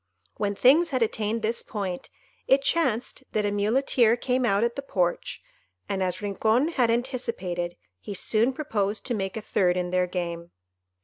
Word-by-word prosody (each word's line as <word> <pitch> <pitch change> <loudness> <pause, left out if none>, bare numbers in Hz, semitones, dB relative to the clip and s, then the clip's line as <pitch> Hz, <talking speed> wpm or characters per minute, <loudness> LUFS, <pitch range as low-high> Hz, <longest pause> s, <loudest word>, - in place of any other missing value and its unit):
When 205 -1 -1
things 290 - +5
had 255 -3 +1
attained 220 0 -1
this 225 +2 0
point, 195 -5 -5 0.4
it 275 +1 +4
chanced 265 -5 0
that 210 -1 +1
a 205 - +1
Muleteer 225 +3 +3
came 250 +1 0
out 200 0 +2
at 235 0 0
the 275 - -3
porch, 180 -10 -2 0.4
and, 195 - -2
as 185 +1 -2
Rincon 220 +8 +2
had 250 -8 +1
anticipated, 230 -8 -2 0.2
he 200 - -7
soon 225 +6 +2
proposed 215 -8 -2
to 245 - -1
make 195 -2 -3
a - - -3
third 180 -3 +1
in 180 0 -2
their 180 0 +2
game. 170 -1 -4
215 Hz, 170 wpm, -26 LUFS, 190-245 Hz, 0.4 s, things